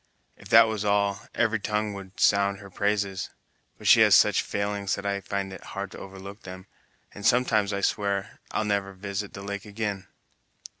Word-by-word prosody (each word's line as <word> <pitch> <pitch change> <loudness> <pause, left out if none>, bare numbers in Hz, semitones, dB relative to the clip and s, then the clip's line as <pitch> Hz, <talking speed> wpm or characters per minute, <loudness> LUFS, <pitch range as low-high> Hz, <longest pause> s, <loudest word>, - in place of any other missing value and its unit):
If 100 - -14
that 115 +1 +8
was 110 -2 -2
all, 100 -1 +1
every 115 -1 +1
tongue 105 0 -1
would 95 -1 -10
sound 100 0 +3
her 100 -1 -12
praises; 100 -1 -1 0.5
but - - -13
she - - +7
has - - +7
such - - +5
failings 100 -1 -2
that 100 - -8
I 100 0 -1
find 100 0 -3
it - - -10
hard 100 -1 -4
to - - -10
overlook 95 +2 -10
them, 95 0 -10 0.5
and 105 - -10
sometimes 110 -4 +3
I 100 0 -2
swear 100 -1 -1
I'll 110 - -1
never 100 -1 -1
visit 100 +1 -5
the 100 - -8
lake 100 -1 -5
again." 100 -2 -4
100 Hz, 185 wpm, -26 LUFS, 100-105 Hz, 0.5 s, that